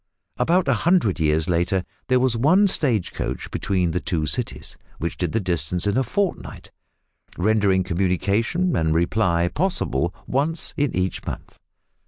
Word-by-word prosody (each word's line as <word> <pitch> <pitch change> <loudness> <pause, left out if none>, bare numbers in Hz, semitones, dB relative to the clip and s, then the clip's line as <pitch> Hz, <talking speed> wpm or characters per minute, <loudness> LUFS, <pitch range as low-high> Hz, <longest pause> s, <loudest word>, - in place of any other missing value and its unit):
About 175 0 +2
a 135 - +4
hundred 170 - +2
years 75 0 +1
later 90 +2 +1 0.2
there 130 -1 +3
was 125 -2 +2
one 160 - +4
stage 125 - +1
coach - - -4
between 90 -3 0
the 90 - -1
two 80 -5 -2
cities, 70 -1 -4 0.2
which 85 +4 -3
did 90 -4 -2
the 115 - +1
distance 90 -2 -1
in 100 0 +1
a 130 - +3
fortnight, 195 - -3 0.7
rendering 100 -1 +2
communication 100 - 0
and 80 -1 +1
reply 85 0 +2
possible 90 - -1
once 155 +5 -1
in 145 -2 0
each 90 0 -1
month. - - -7
100 Hz, 150 wpm, -23 LUFS, 85-135 Hz, 0.7 s, a